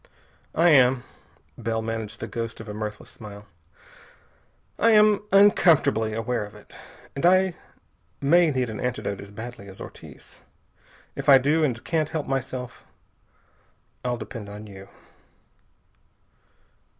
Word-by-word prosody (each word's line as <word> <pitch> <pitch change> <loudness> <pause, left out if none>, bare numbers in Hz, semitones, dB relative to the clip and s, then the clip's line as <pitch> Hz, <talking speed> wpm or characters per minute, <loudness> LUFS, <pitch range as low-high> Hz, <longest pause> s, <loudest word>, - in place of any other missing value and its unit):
"I 170 +2 +5
am" 130 -4 +5 0.6
Bell 115 -1 -2
managed 110 -1 -5
the - - -4
ghost 115 0 -5
of 115 - -9
a 105 - -6
mirthless 105 0 -6
smile 105 -1 -11 1.3
"I 230 - +4
am 210 -1 +5
uncomfortably 165 - +4
aware 115 +1 -2
of 105 +1 -11
it. 105 - -16 0.4
And 140 - -4
I 185 +1 +4 0.7
may 165 +4 +4
need 130 -4 0
an 110 - -6
antidote 125 -5 -3
as 100 - -11
badly 110 0 -9
as 95 - -11
Ortiz. - - -12 0.7
If - - -2
I 135 - +10
do, 150 +5 +2
and 120 -5 -1
can't 155 -3 0
help 155 -3 -3
myself, 130 -2 -4 1.2
I'll 125 -1 -1
depend 115 -3 -8
on 105 +1 -9
you." 95 -2 -12
120 Hz, 130 wpm, -25 LUFS, 110-150 Hz, 1.3 s, I